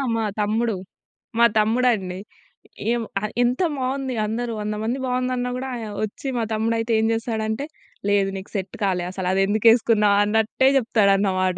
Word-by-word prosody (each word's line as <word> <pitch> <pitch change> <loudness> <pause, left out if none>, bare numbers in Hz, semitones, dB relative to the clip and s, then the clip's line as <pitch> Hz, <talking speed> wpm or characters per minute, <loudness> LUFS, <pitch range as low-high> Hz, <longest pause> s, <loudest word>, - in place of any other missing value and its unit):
మా 225 -1 0
తమ్ముడు, 220 +1 +1 0.6
మా 235 - +7
తమ్ముడండి. 215 -5 +1 0.7
ఏం 240 -1 0 0.4
ఎంత 245 +2 +1 0.2
బావుంది 260 0 -2
అందరూ 230 +2 -2
100 210 0 -2
మంది 240 +4 -1
బావుందన్నా 250 0 -1
గూడా, 265 +1 -4 0.3
వచ్చి 215 +6 -5
మా 230 - 0
తమ్ముడు 225 +1 0
అయితే 230 +1 -2
ఏం 220 - +2
జేస్తాడంటే, 225 +2 -2 0.4
లేదు 200 -1 +2
నీకు 190 - -9
సెట్ 190 -1 -3
కాలే. 185 -3 +1
అసలు 185 -1 -4
అది 195 - +2
ఎందుకేసుకున్నావు 215 -1 +4
అన్నట్టే 220 +5 +2
జెప్తాడన్నమాట 195 -5 +2
220 Hz, 140 wpm, -23 LUFS, 205-240 Hz, 0.7 s, మా